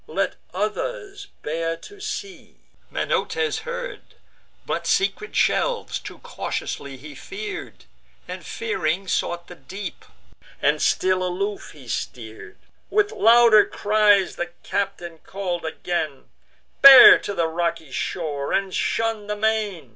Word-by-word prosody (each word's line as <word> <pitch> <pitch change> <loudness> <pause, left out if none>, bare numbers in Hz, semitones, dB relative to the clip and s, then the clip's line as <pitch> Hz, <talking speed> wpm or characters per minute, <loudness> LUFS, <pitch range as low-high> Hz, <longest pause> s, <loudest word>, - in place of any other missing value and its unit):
"Let - - -2
others 410 -6 -4 0.2
bear 165 +2 -2
to 405 - -14
sea!" 425 -2 -7 0.3
Menoetes 450 0 -1
heard; - - -6 0.6
But - - -3
secret 425 +3 0
shelves - - +1
too - - -10
cautiously 140 -1 -5
he 145 +3 -11
fear'd, 405 - -8 0.4
And, - - -7
fearing, 195 - -2
sought 175 -1 -1
the 180 - -11
deep; 185 +7 -8 0.6
and - - +1
still 185 0 +2
aloof 195 +3 -3
he 135 -4 -15
steer'd. 110 -5 -6 0.3
With 410 +1 +2
louder 235 - +6
cries 205 -2 +2
the 175 - -2 0.2
captain 185 -5 -3
call'd 180 -3 -4
again: 160 -3 -4 0.5
"Bear 270 -2 +11
to 200 - -5
the 170 - +1
rocky 165 -2 -2
shore, 145 -4 -3
and 195 -1 0
shun 225 -2 -1
the 210 - -2
main." 210 - -1
195 Hz, 120 wpm, -23 LUFS, -, 0.6 s, Bear